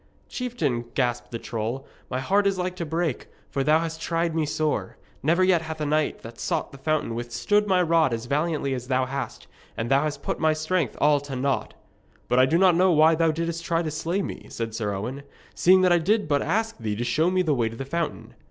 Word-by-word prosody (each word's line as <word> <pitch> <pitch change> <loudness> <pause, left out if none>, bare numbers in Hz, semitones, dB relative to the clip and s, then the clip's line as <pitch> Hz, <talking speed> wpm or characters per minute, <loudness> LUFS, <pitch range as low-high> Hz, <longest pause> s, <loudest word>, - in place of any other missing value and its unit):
'Chieftain,' 155 - -2
gasped 120 -2 0
the 115 - -4
troll, 115 +4 -4 0.2
'my 130 - -2
heart 200 +9 +2
is 195 -1 +1
like 180 0 -2
to 170 -3 -4
break, 160 -3 -2 0.2
for 135 - 0
thou 155 +3 +4
hast 160 -1 -5
tried 165 0 0
me 160 -2 0
sore. 150 -10 -1 0.2
Never 170 +6 +3
yet 185 -3 +4
hath 160 -1 -6
a 150 - -1
knight 155 +1 0
that 115 0 -10
sought - - -2
the 140 - -12
fountain 155 -4 0
withstood 120 - 0
my 185 -2 +3
rod 165 -4 +3
as 115 0 -3
valiantly 145 0 0
as 125 -1 -5
thou 130 0 +1
hast, 135 -2 -5 0.3
and 115 +3 -3
thou 135 +1 +5
hast 150 -1 -3
put - - -2
my 155 0 +3
strength 155 -2 -1
all 145 0 +4
to 140 -1 -7
naught.' 135 +1 -1 0.5
'But 125 +1 +3
I 130 - +7
know 175 +6 +4
not 180 0 +3
why 155 +2 +6
thou 165 0 +2
didst 165 +1 -2
try 165 0 0
to 155 - -3
slay 170 +6 -1
me,' - - -7
said 115 -1 -4
Sir 110 -2 -2
Owen, 125 +8 -4 0.3
'seeing 185 +1 +5
that 180 -1 +5
I 175 - +4
did 205 +4 +1
but 145 -1 +2
ask 220 +4 -1
thee 110 -2 -2
to 115 - -2
show 155 +8 +2
me 185 0 +2
my 160 - 0
way 120 -5 +1
to 115 - -9
the 135 - -5
fountain.' 165 +2 -3
155 Hz, 230 wpm, -25 LUFS, 130-170 Hz, 0.5 s, I